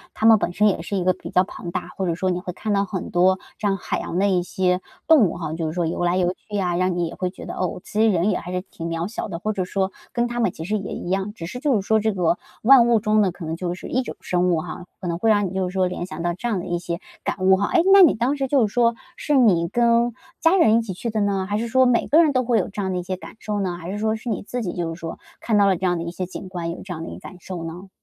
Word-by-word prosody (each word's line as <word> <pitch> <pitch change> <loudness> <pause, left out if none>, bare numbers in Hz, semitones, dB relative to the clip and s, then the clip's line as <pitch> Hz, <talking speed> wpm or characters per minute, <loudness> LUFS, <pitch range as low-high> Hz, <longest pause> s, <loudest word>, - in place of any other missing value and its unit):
它 220 - -1
们 225 -1 +7
本 175 - -1
身 210 +4 +3
也 185 -5 +1
是 200 +3 -3
一 180 - 0
个 185 - +3
比 - - -10
较 185 - +3
庞 185 -2 -8
大， 180 +1 -4
或 190 - -2
者 170 - 0
说 185 +1 0
你 180 - -1
会 180 0 -5
看 210 +3 -2
到 200 0 +2
很 190 -2 -5
多 185 +2 +3 0.2
这 210 - 0
样 195 -1 +1
海 - - -3
洋 170 - -4
的 200 +2 +3
一 185 -2 +2
些 180 +1 0 0.3
动 300 - +6
物 - - -6
哈， 160 -2 -4
就 165 -1 -2
是 155 - -3
说 175 -1 0
游 170 +2 -2
来 175 +1 +2
游 180 -1 +1
去 205 +1 -6
啊， 180 -2 0
让 185 0 +1
你 175 - +1
也 165 - -6
会 185 - -2
觉 185 - -11
得， - - -6
哦， 185 -1 -2
其 215 - -1
实 225 - +5
人 185 +2 +2
也 185 - -1
还 180 - -7
是 180 - -1
挺 165 - -6
渺 165 +2 -2
小 215 - -5
的， 170 - -5
或 215 +5 -2
者 190 -2 -1
说 190 +1 -1 0.2
跟 240 0 +1
它 240 0 -4
们 215 -7 +2
其 160 - -8
实 210 +5 -1
也 200 -2 -4
一 - - -6
样， 195 +2 -1
只 165 - -7
是 250 +8 -6
就 280 -2 +2
是 195 - -6
说 220 0 +4
这 220 -1 0
个 175 -2 +1 0.2
万 245 -1 +7
物 235 -2 +4
中 215 +1 +2
的 190 - +2
可 170 -1 -9
能 160 - -3
就 175 0 -3
是 185 - -9
一 260 - +1
种 245 - -6
生 180 0 +1
物 165 -3 +2
哈， 175 +2 -7
可 180 - -5
能 170 0 -2
会 225 - +2
让 205 -2 +3
你 180 - -7
就 190 -1 -1
是 - - -10
说 190 -1 +2
联 180 -1 -3
想 170 - -6
到 175 0 0
这 215 +7 -4
样 210 -6 0
的 - - -6
一 175 -1 -2
些 170 -1 -4 0.2
感 - - -2
悟 190 0 +5
哈。 200 - 0
哎， 350 - +5
那 395 - +9
你 330 - +7
当 245 +5 0
时 270 -1 -1
就 260 -5 +3
是 205 - -11
说 235 -1 +3 0.2
是 295 - 0
你 185 -10 +4
跟 235 +3 +2 0.3
家 330 +3 +4
人 225 -11 +5
一 - - +2
起 215 -4 -5
去 230 +6 -4
的 220 - -1
呢， 195 -2 0
还 205 - 0
是 235 - -2
说 260 +3 +4
每 245 -2 +2
个 320 +3 +6
人 305 - +3
都 255 -2 +1
会 235 -2 +2
有 - - -2
这 205 +1 -5
样 190 -1 -1
的 180 - -1
一 180 - -3
些 185 +1 -4
感 - - -11
受 210 -1 -3
呢？ 185 -3 -1
还 175 +1 -7
是 205 - -4
说 220 +1 0
是 235 +2 -6
你 215 - -1
自 245 +4 -4
己 180 - -3
就 170 -2 -3
是 165 - -11
说 165 0 -6 0.2
看 220 -3 +1
到 200 - +5
了 195 - +3
这 190 - -3
样 175 -1 +2
的 165 - -3
一 170 - -4
些 185 +1 -4
景 185 +1 -8
观， 175 -2 -4
有 170 - -7
这 190 - -6
样 165 -1 -6
的 - - -6
一 - - -8
感 - - -11
受 175 -1 -6
呢？ 180 +4 -8
190 Hz, 360 characters per minute, -23 LUFS, 175-220 Hz, 0.3 s, 那